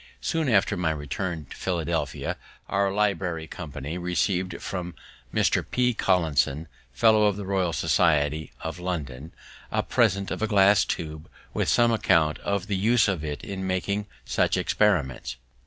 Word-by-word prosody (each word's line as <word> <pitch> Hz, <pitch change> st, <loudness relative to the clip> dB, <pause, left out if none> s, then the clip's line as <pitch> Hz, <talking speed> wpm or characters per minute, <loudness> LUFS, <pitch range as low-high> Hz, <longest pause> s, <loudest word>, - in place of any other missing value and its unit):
Soon 160 Hz, -4 st, 0 dB
after 105 Hz, -5 st, +3 dB
my 90 Hz, -2 st, 0 dB
return 80 Hz, +2 st, -3 dB
to -, -, -7 dB
Philadelphia, 85 Hz, -5 st, -2 dB, 0.3 s
our 100 Hz, 0 st, +1 dB
library 95 Hz, -5 st, 0 dB
company 75 Hz, 0 st, -6 dB
receiv'd 90 Hz, 0 st, -1 dB
from 90 Hz, -3 st, -5 dB, 0.4 s
Mr. -, -, +2 dB
P. 125 Hz, -1 st, +2 dB
Collinson, 80 Hz, -6 st, +1 dB, 0.2 s
Fellow 105 Hz, -, +4 dB
of 100 Hz, -1 st, 0 dB
the 100 Hz, -, -5 dB
Royal 95 Hz, -3 st, 0 dB
Society 75 Hz, -2 st, +1 dB
of 80 Hz, +2 st, -5 dB
London, 80 Hz, -5 st, -4 dB, 0.4 s
a -, -, +1 dB
present 100 Hz, +1 st, +1 dB
of -, -, -3 dB
a 110 Hz, -, +1 dB
glass 100 Hz, -2 st, +5 dB
tube, 80 Hz, -1 st, -5 dB, 0.2 s
with -, -, 0 dB
some 120 Hz, -1 st, +4 dB
account 80 Hz, -8 st, +2 dB
of 100 Hz, -2 st, -2 dB
the 100 Hz, -, -2 dB
use 110 Hz, +5 st, +3 dB
of 95 Hz, -6 st, -1 dB
it 75 Hz, -1 st, -5 dB
in 95 Hz, -1 st, -4 dB
making 100 Hz, +2 st, -1 dB, 0.2 s
such -, -, +1 dB
experiments. 75 Hz, -, +1 dB
90 Hz, 150 wpm, -26 LUFS, 80-100 Hz, 0.4 s, glass